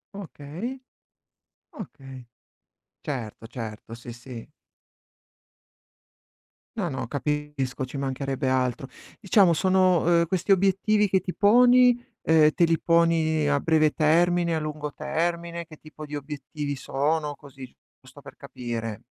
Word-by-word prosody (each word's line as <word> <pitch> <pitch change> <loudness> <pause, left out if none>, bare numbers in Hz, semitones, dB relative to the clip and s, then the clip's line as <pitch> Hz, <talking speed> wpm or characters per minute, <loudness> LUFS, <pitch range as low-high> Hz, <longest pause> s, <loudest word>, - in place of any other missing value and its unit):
Okay. 195 - -7 0.9
Okay. 135 - -11 0.8
Certo, 115 -5 -6
certo, 115 -1 -8
sì, 120 0 -10
sì. 125 +1 -11 2.3
No, 180 -5 -1
no, 130 -5 -4
capisco, 145 -1 -3
ci 130 - -11
mancherebbe 135 -1 -2
altro. 130 0 -1 0.3
Diciamo 195 -4 +4
sono 185 0 +3 0.2
uhm, 170 - +2
questi 185 +3 -1
obiettivi 195 +2 +3
che 190 -1 +1
ti 180 0 -5
poni, 245 +3 +5 0.2
ehm, 155 -1 +5
te 170 - +3
li 165 0 +2
poni 165 -2 +2
a 145 -1 +1
breve 155 -2 +3
termine, 170 +2 +2
a - - 0
lungo 150 -1 -5
termine, 170 +2 -3
che 155 -1 -14
tipo 155 0 -11
di 150 0 -5
obiettivi 145 0 -6
sono? 145 +3 -1
Così, 135 -2 -13 0.3
giusto - - -16
per - - -13
capire. 115 -2 -6
155 Hz, 120 wpm, -25 LUFS, 135-175 Hz, 2.3 s, poni